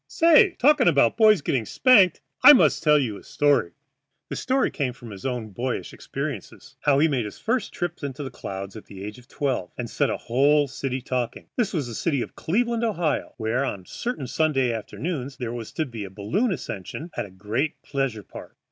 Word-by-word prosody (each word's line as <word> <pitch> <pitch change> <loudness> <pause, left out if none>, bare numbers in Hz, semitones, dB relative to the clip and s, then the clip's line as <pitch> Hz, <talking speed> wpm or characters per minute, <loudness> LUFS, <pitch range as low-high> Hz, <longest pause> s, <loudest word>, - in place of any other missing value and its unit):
Say, 335 +3 +5
talking 290 -1 +4
about 140 -8 +4
boys 215 -5 +5
getting 125 -4 0
spanked, 200 - +5 0.2
I 290 +3 +12
must 150 - +4
tell 150 -2 +5
you 120 -8 -1
a - - -14
story." 145 -12 +1 0.6
The - - -4
story 265 +1 +1
was 130 -8 -2
from 120 -3 -10
his 100 +5 -5
own 120 -4 -3
boyish 120 +5 -3
experience - - -6
how 145 -2 +3
he 155 +3 +4
made 130 -7 0
his 105 - -8
first 230 -2 -1
trip 175 0 -3
to 140 - -4
the 135 0 -7
clouds 95 -4 -7
at 110 - -10
the 95 -1 -10
age 105 +4 -7
of 125 - -19
twelve, 130 -13 -2
and 120 - -3
set - - 0
a - - -1
whole 145 +4 +3
city 130 -1 -4
talking. 125 -2 -3
This 235 -5 0
was 155 -8 -1
the 120 - -7
city 140 +1 0
of - - -10
Cleveland, 235 +6 0
Ohio, 175 -9 -1
where 115 +3 0
on 100 -8 -3
a - - -21
certain 235 - -4
Sunday 135 -3 +1
afternoon 135 +5 -4
there 120 -2 -4
was 115 -2 -6
to 160 - -1
be 115 -6 -7
a 100 - -7
balloon 110 - -1
ascension 140 - -6
at - - -2
the - - -12
great 105 +10 -3
pleasure 135 -7 -2
park. - - -12
135 Hz, 210 wpm, -24 LUFS, 115-170 Hz, 0.6 s, I